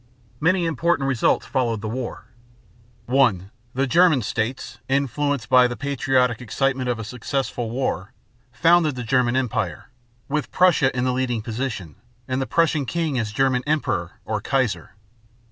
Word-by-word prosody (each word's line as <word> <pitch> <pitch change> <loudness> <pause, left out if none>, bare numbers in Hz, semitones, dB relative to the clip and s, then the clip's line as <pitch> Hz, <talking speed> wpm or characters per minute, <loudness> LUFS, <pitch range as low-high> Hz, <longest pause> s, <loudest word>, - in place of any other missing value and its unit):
Many 175 +2 +2
important 160 -1 +1
results 130 -4 +2
followed 120 -4 -1
the 110 - -4
war: 120 +2 -5 0.8
(1) 115 -7 +2 0.2
The 135 +1 +2
German 155 -2 +4
states, 110 +5 -3
influenced 140 0 0
by 125 -1 +6
the 120 - -5
patriotic 130 -3 +1
excitement 130 +1 -1
of 120 - 0
a 115 - -5
successful 125 +1 -3
war, 110 -6 -2 0.4
founded 165 +2 +3
the 125 - -4
German 120 +1 +2
Empire, 110 - -2 0.4
with 150 +1 -2
Prussia 175 -7 +4
in 120 - +1
the 125 0 +1
leading 125 -3 -1
position, 110 - -4 0.3
and 130 0 -1
the 135 - -2
Prussian 160 -5 +1
king 160 -5 -1
as 110 -3 -2
German 130 +2 +1
emperor 120 - -1
or 110 -2 -2
"Kaiser." 130 -4 -1
130 Hz, 145 wpm, -23 LUFS, 115-140 Hz, 0.8 s, by